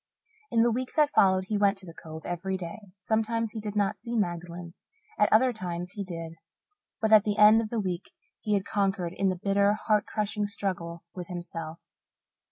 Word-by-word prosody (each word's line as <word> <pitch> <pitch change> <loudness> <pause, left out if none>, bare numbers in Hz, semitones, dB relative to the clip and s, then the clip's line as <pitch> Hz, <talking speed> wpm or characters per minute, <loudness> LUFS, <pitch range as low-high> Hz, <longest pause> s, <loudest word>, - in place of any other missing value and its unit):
In 230 - +3
the 240 - +3
week 250 +2 -3
that 300 -2 +4
followed 190 -1 +4
he 210 +1 -1
went 200 0 +3
to 195 - -9
the 165 - -10
Cove 160 -1 -10
every 185 +2 -2
day. 175 +3 -7 0.2
Sometimes 225 +3 0
he 220 - -5
did 210 -1 -5
not 205 0 +1
see 235 +3 -5
Magdalen; 175 -3 -3 0.5
at 210 - +4
other 250 +3 +5
times 180 -4 -5
he 200 0 -4
did. 165 -3 -6 0.7
But 220 -1 0
at 215 -2 +8
the 210 -1 -1
end 210 +2 +7
of 220 - -4
the 230 - -1
week 180 -4 -3 0.3
he 210 -1 0
had 195 -1 -1
conquered 195 -4 0
in 195 +1 +1
the 185 - 0
bitter, 200 +2 +2
heart 210 -1 +1
crushing 210 -1 -1
struggle 175 -5 -4
with 180 -2 -7
himself. 170 -2 -6
200 Hz, 195 wpm, -28 LUFS, 175-215 Hz, 0.7 s, at